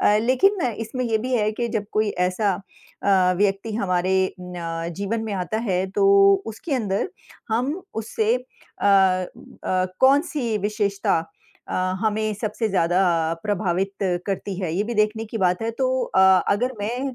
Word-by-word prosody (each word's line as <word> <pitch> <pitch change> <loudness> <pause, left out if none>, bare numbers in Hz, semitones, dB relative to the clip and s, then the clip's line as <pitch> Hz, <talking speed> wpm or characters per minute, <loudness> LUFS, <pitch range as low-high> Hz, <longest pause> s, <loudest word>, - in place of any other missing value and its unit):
अ, 205 - +4
लेकिन 260 - +3
इसमें 225 +4 -4
ये 225 -2 +1
भी 255 +4 -4
है 210 -1 +1
कि 235 +2 -2
जब 215 -2 -2
कोई 215 0 +1 0.2
ऐसा 195 +2 0 0.5
अ, 185 -2 +4
व्यक्ति 200 +2 0
हमारे 190 -2 +1
न 170 -2 -5
जीवन 200 +3 -2
में 215 - -4
आता 185 +3 -2
है 185 0 +1
तो 195 0 +2 0.4
उसके 225 +7 -4
अंदर, 205 - -1 0.4
हम 255 +10 -1
उससे 220 0 0
अ 250 -4 -8
अ, 185 -1 +1 0.2
कौन 270 +2 +6
सी 240 -8 -1
विशेषता 205 -3 0 0.5
अ, - - -4 0.3
हमें 215 0 0
सबसे 215 +1 -2
ज़्यादा 180 -1 +2 0.4
प्रभावित 195 -2 -1 0.3
करती 195 0 -3
है, 175 -4 -2
ये 195 - +1
भी 235 +2 -4
देखने 215 +1 +1
की 225 +1 -6
बात 180 +1 +1
है 225 - -1
तो 255 - +2
अ, - - -2 0.3
अगर 245 +6 0
मैं 250 +5 -3
210 Hz, 160 wpm, -23 LUFS, 190-225 Hz, 0.5 s, कौन